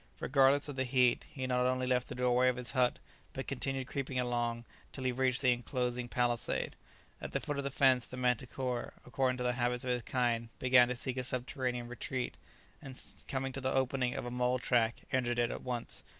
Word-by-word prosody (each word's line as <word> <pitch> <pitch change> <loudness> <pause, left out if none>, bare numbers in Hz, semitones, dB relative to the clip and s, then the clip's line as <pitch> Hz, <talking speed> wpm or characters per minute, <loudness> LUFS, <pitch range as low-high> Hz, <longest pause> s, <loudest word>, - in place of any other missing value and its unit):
Regardless 135 +2 +4
of 145 -2 -6
the 130 - +2
heat 125 -1 +3
he 130 -2 -4
not 125 0 +2
only 130 0 +1
left 125 -1 +1
the - - -6
doorway 125 0 +3
of 125 - 0
his 125 -1 -2
hut, 125 -1 +2 0.4
but - - -4
continued 135 -1 -2
creeping 135 -1 -3
along 120 -1 -1 0.3
till 130 - -6
he 130 - +2
reached 130 +1 +1
the 130 - +6
enclosing 125 0 -2
palisade. 120 -1 0 0.5
At - - -6
the - - +1
foot 145 -1 -3
of - - -2
the 140 - -1
fence 130 -2 +3
the 125 - -8
manticora, 125 0 -1
according 125 +1 0
to 125 - -2
the 125 0 +1
habits 125 0 0
of 125 - -1
its 125 -1 0
kind, 115 -2 0
began 125 -1 +6
to 125 - -2
seek 130 +1 -4
a 130 - 0
subterranean 125 -1 -2
retreat, 125 +1 -3 0.5
and 130 -1 -6 0.3
coming 135 0 -2
to 135 - -4
the 130 - 0
opening 130 -1 +1
of - - -3
a 120 - -4
mole 125 +1 +1
track 120 -2 +1
entered 120 -2 +1
it 120 -1 +2
at - - -5
once. 120 -2 -3
125 Hz, 210 wpm, -33 LUFS, 125-130 Hz, 0.5 s, the